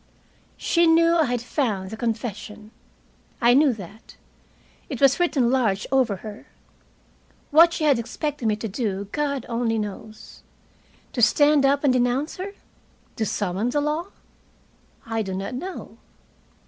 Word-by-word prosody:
She 340 -1 +2
knew 335 +1 +4
I 325 -2 +3
had 245 -2 -2
found 210 -8 -2
the - - -5
confession. 215 -2 -5 0.7
I 240 0 +5
knew 285 +1 +5
that. 210 +1 -12 0.7
It 265 -6 -5
was 275 +2 +4
written 275 -9 +2
large 225 -7 +1
over 255 -6 +2
her. 215 0 -9 1.0
What 330 +3 +7
she 320 - -3
had 285 -5 +4
expected 280 +2 -3
me 215 - +2
to 220 +2 -5
do 200 -2 -3
God 280 -4 -2
only 230 -1 -1
knows. 215 +1 -7 0.7
To 245 - -2
stand 290 +3 +4
up 280 +1 +1
and 275 -3 +4
denounce 250 +4 0
her? 390 +2 -6 0.6
To 220 -3 -1
summon 205 +4 -1
the 290 - 0
law? 300 +4 -1 1.0
I 225 0 -2
do 190 -3 -4
not 195 +4 -4
know. 360 +9 -7
245 Hz, 145 wpm, -23 LUFS, 215-290 Hz, 1.0 s, What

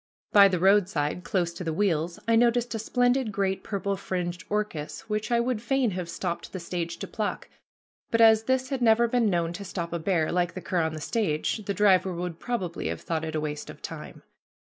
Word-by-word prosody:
By 200 -1 +8
the 185 -2 0
roadside, 180 -4 +2
close 175 -3 0
to 180 - -6
the 165 - -2
wheels, 170 -3 0
I 230 - +4
noticed 240 +1 +3
a 225 - -2
splendid 245 +1 +1
great 195 -1 -1
purple 200 -1 -2
fringed 180 -2 -3
orchis 205 -8 -3
which 215 -1 -3
I 235 - +4
would 235 -2 0
fain 255 -1 +1
have 180 -2 -4
stopped 170 0 -4
the 185 - -4
stage 170 -1 -4
to - - -6
pluck, 215 -2 -3 0.6
but 230 - +1
as 220 -1 +6
this 260 0 +1
had 270 -2 -2
never 235 0 +5
been 235 -2 +2
known 170 -2 0
to 200 +3 -6
stop 175 -2 -5
a 170 - -1
bear, 165 -2 +1
like 175 -1 0
the - - -4
cur 175 0 0
on 160 0 -1
the 155 - -7
stage, 210 +1 -1
the 200 - -2
driver 190 -3 +4
would 175 -1 -4
probably 190 -9 -3
have - - -4
thought 160 -1 -2
it 160 -1 -4
a - - +1
waste 150 -1 -4
of - - -11
time. - - -8
190 Hz, 215 wpm, -27 LUFS, 170-225 Hz, 0.6 s, By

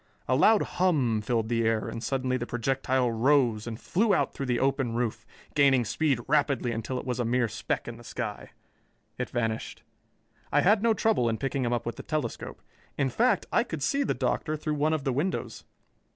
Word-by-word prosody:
A 130 - +2
loud 215 +10 +5
hum 140 -12 +1
filled 115 0 0
the 115 0 +1
air, 110 -1 +1
and 115 - -5
suddenly 130 -1 -1
the 120 -1 -3
projectile 130 0 0
rose 120 -2 +2
and 115 -1 -5
flew 205 +2 +2
out - - 0
through 135 - -4
the 120 -1 +1
open 135 -3 0
roof, 115 -2 -2 0.3
gaining 135 -4 +4
speed 140 +2 +1
rapidly 140 -4 +1
until 115 +3 -3
it - - -5
was 125 -1 -2
a - - +1
mere 120 +1 +1
speck 105 - -3
in - - -6
the - - -13
sky. - - -5 0.7
It 125 - -2
vanished. 115 -2 -3 0.7
I - - +4
had 205 +3 +4
no 230 -1 +3
trouble 210 - +2
in 115 - -1
picking 135 0 -2
him 120 - 0
up 120 -1 -1
with 115 -1 -4
the - - -6
telescope. 150 -7 -4 0.3
In 135 -2 +1
fact, 235 - +2
I 235 - +3
could 160 - -5
see 280 - +1
the 275 - 0
Doctor 155 0 -1
through 155 0 -2
one 150 +2 +1
of 155 -3 -1
the 135 -2 0
windows. 160 +9 -3
130 Hz, 205 wpm, -28 LUFS, 120-150 Hz, 0.7 s, loud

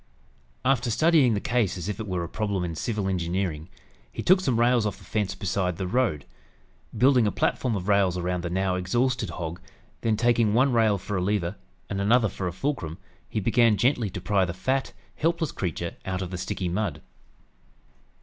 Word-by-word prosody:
After 130 -2 +2
studying 135 -1 +4
the - - 0
case 115 -4 0
as 90 - -5
if 105 0 -3
it 110 - -4
were 90 -2 -2
a - - -4
problem 100 -1 -2
in 85 -2 -3
civil 105 +4 -2
engineering, 90 -3 -2 0.4
he - - -5
took 185 +1 +5
some 125 -9 +1
rails 120 0 +4
off 105 -2 -2
the - - -16
fence 105 -3 -2
beside 90 -2 -1
the 95 - -2
road. 90 - 0 0.7
Building 125 -1 +5
a - - +1
platform 120 +3 0
of 95 -1 -4
rails 100 -3 +3
around 90 0 -1
the 85 - -2
now 95 +1 0
exhausted 120 +5 0
hog, 85 0 -5 0.4
then 110 -2 +1
taking 115 -2 +3
one 130 +2 +4
rail 110 -3 +3
for 100 +1 -4
a - - 0
lever 95 -1 0 0.3
and 100 0 -3
another 110 +2 +4
for 95 - -4
a - - -2
fulcrum, 90 - -3 0.3
he - - -1
began 115 +1 +3
gently 120 0 +2
to 90 - -6
pry 95 +2 +1
the 85 -2 -3
fat, 130 +8 -1 0.3
helpless 165 -1 0
creature 85 -2 -3
out 95 0 -3
of 90 - -6
the 90 - -4
sticky 95 -1 -3
mud. 95 +2 -2
100 Hz, 195 wpm, -26 LUFS, 90-120 Hz, 0.7 s, took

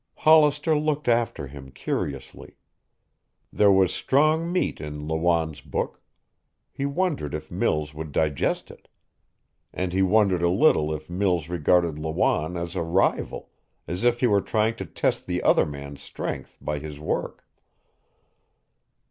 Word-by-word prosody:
Hollister 155 0 +4
looked 150 -1 -1
after 115 -10 +1
him 70 0 -11
curiously. 65 0 -5 1.0
There 105 -1 +5
was 95 -2 +4
strong 155 +5 +2
meat 180 - -1
in 75 0 -6
Lawanne's 80 -1 0
book. - - -4 0.7
He 140 - -3
wondered 140 - -1
if 75 0 -7
Mills 75 -1 -1
would 80 0 -7
digest 75 -2 0
it. - - -18 0.8
And 90 -1 -3
he 95 - +2
wondered 95 -2 +3
a 85 - +3
little 90 - +3
if 75 0 -5
Mills 90 -3 0
regarded 85 -1 +2
Lawanne 80 +2 0
as 85 0 -5
a - - -1
rival, 85 +4 0 0.3
if 120 +9 0
he - - +4
were 100 -4 +3
trying 110 +3 0
to 95 - -6
test - - -1
the - - -2
other - - +4
man's 70 -1 -8
strength - - -6
by 75 -1 -3
his 75 -1 -8
work. 75 - -3
85 Hz, 140 wpm, -25 LUFS, 75-115 Hz, 1.0 s, There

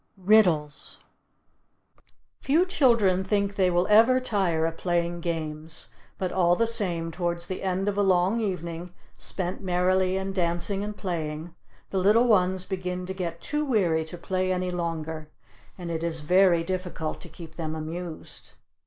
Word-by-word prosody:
RIDDLES 180 -7 +2 1.4
Few 320 +7 +3
children 230 - +3
think 200 0 0
they 185 -2 +3
will 175 0 +2
ever 225 +5 +6
tire 190 -10 0
of 165 0 -2
playing 175 0 -1
games; 160 -4 -4 0.3
but 185 -2 -2
all 175 -2 +3
the 230 - +2
same, 175 -8 -2
towards 170 0 -2
the 185 - -5
end 190 +1 -1
of 205 0 0
a - - +5
long 190 +3 +3
evening, 175 -3 -4 0.2
spent 185 +1 -4
merrily 185 0 +2
in 190 0 -3
dancing 180 +2 -1
and 210 0 -5
playing, 160 -2 -4 0.4
the 195 - 0
little 215 +6 +4
ones 185 -4 +3
begin 180 -1 -3
to 190 - -4
get 170 -3 -4
too 300 0 -1
weary 185 - +2
to 170 +2 -7
play 185 +1 -1
any 180 0 -1
longer, 160 -3 -4 0.5
and 175 -2 -5
it 160 -1 -2
is 165 -2 +1
very 180 +1 +4
difficult 180 -3 -4
to 175 - -10
keep 160 0 -11
them 160 -2 -4
amused. 160 +1 -7
180 Hz, 155 wpm, -26 LUFS, 170-195 Hz, 1.4 s, ever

